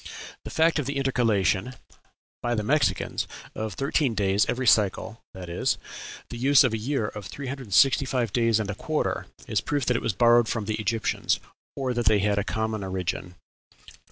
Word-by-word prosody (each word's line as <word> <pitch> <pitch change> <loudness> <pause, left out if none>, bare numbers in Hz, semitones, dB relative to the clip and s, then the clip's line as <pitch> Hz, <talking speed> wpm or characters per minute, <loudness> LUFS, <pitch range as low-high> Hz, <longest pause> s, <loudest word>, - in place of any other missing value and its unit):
The - - -5
fact 160 0 +2
of 140 - -3
the 140 0 -2
intercalation 120 -5 +1 0.7
(by 120 0 0
the 105 - -1
Mexicans) 145 +7 0 0.3
of 110 -2 -4
thirteen 140 -3 0
days 100 0 +2
every 130 +1 -1
cycle 110 0 +2
that 90 -1 -8
is, 85 - 0 0.5
the 120 - -7
use 140 +3 +6
of 125 -4 +1
a - - 0
year 115 -1 -1
of 100 -3 -8
three 140 +10 -7
hundred 130 -1 -6
and 100 - -7
sixty 135 +3 +5
five 125 -5 -1
days 115 -2 +3
and 105 -1 -2
a - - -4
quarter 155 +10 -2 0.2
is - - +1
a - - -8
proof 145 -3 -1
that 125 - +1
it - - 0
was 110 - -1
borrowed 120 +3 +5
from 110 -2 -2
the 110 +1 -2
Egyptians, 115 0 0 0.4
or 130 -2 -1
that 120 -1 -1
they 110 - +5
had 100 0 +1
a - - 0
common 110 0 -2
origin." 90 -1 -4
115 Hz, 200 wpm, -26 LUFS, 105-130 Hz, 0.7 s, use